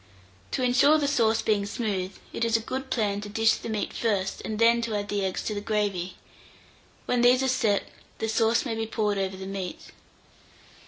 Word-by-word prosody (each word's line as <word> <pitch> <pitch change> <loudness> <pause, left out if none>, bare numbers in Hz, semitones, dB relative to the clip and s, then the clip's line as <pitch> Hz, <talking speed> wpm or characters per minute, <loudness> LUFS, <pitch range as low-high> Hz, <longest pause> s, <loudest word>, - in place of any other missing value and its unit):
To 260 - -1
insure 270 +5 +5
the 290 -2 0
sauce 230 -6 +2
being 205 -2 +1
smooth, 200 -4 -2 0.2
it - - -2
is 230 0 +3
a - - -3
good 260 +4 -5
plan 205 -3 0
to 205 - -7
dish 225 +1 +3
the - - -7
meat 215 -2 -2
first, 200 -4 -1
and 215 - -3
then 230 +1 +4
to 230 -2 -2
add 205 0 -3
the 205 -1 -1
eggs 190 -1 -2
to 215 - -2
the 205 - -3
gravy: 205 -4 -1 0.9
when 245 -1 +1
these 250 +2 +5
are - - +1
set, 225 -6 +2 0.3
the 220 - -2
sauce 225 +2 +2
may 235 - -2
be 225 0 -2
poured 210 -2 0
over 190 0 -2
the 190 - -7
meat. 190 -2 -6
220 Hz, 205 wpm, -26 LUFS, 205-235 Hz, 0.9 s, insure